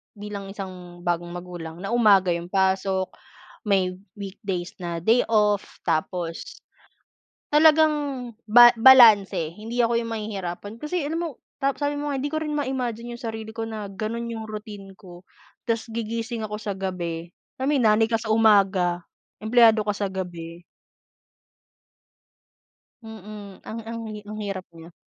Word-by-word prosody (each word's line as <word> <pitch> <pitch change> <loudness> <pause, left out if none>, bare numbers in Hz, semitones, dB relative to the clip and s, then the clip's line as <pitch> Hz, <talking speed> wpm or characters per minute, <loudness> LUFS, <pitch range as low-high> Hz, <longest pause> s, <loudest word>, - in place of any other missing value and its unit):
Bilang 205 -1 -7
isang 180 -3 -9
bagong 175 -1 -1
magulang 175 -2 -8
na 195 - -4
umaga 200 -6 +5
'yong 170 0 -3
pasok, 190 -1 +1 0.5
may 190 -3 +2 0.2
weekdays 195 -3 -5
na 170 -3 -4
day 225 +6 +3
off, 210 -2 +1
tapos 165 +1 -3 0.9
talagang 310 +1 +5 0.5
ba 240 +2 +8
balanse 210 -9 +6
hindi 230 +3 -4
ako 235 0 +3
'yong 230 -1 -5
mahihirapan. 205 -1 -5
Kasi 300 +8 -3
alam 325 +3 -2
mo, 335 - -2 0.3
tap 275 +1 0
sabi 290 0 0
mo 290 0 -3
nga - - -1
hindi 290 - -2
ko - - -1
rin 300 -1 -3
ma-imagine 245 -5 -3
yung - - -16
sarili 220 -1 -6
ko 225 - -2
na 215 -2 -6
ganun 220 +4 -4
yung 225 -1 -5
routine 210 -2 -8
ko. 175 -1 -13 0.4
Tas 230 0 -2
gigising 230 0 -4
ako 210 0 -4
sa 205 -3 -4
gabi, 175 -3 -4 0.2
ay 260 - -4
may 290 -2 +2
nanay 220 -1 +4
ka 225 -1 0
sa 225 - -6
umaga, 195 -5 +4 0.4
empleyado 225 0 +5
ka 210 0 0
sa 200 -1 -1
gabi. 175 -2 -6 2.4
Mm, 210 -2 -10
ang, 225 +1 -6
ang 230 +1 -6
hi 210 - -8
ang 215 - -6
hirap 195 -3 -4
niya. 165 +1 -13
210 Hz, 150 wpm, -24 LUFS, 185-230 Hz, 2.4 s, ba